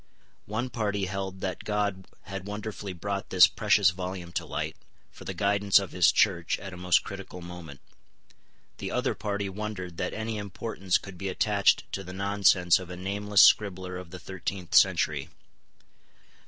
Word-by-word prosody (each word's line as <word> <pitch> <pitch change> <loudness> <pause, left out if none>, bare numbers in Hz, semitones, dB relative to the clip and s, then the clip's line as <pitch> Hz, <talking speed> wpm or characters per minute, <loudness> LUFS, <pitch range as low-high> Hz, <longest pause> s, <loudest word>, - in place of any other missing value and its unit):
One 120 +5 -3
party 105 -4 -1
held 95 0 -5
that 95 -1 -3
God 100 -3 -1 0.2
had 95 0 -7
wonderfully 105 -1 -5
brought 100 +2 -4
this 90 -1 +8
precious 105 -3 +3
volume 90 -1 -6
to - - -3
light, 75 +2 -3 0.4
for - - -13
the - - -4
guidance 100 0 +3
of 100 -2 0
His 90 -2 +5
Church 85 -5 +2
at 95 -1 -8
a - - -7
most 90 0 +2
critical 95 -2 -8
moment. 85 -5 -10 1.0
The - - -4
other - - 0
party 100 -1 -3
wondered 95 -3 -6
that 90 - -3
any 110 0 -3
importance 95 -1 -1
could 95 -3 -11
be 95 - -3
attached 100 +1 +2
to 95 - -4
the 90 0 -9
nonsense 95 -2 +3
of 90 -2 -9
a 90 - -7
nameless 100 +2 +3
scribbler 95 -3 +3
of 90 -2 -10
the 90 - -8
thirteenth 95 -1 -6
century. - - +3
95 Hz, 165 wpm, -28 LUFS, 90-100 Hz, 1.0 s, this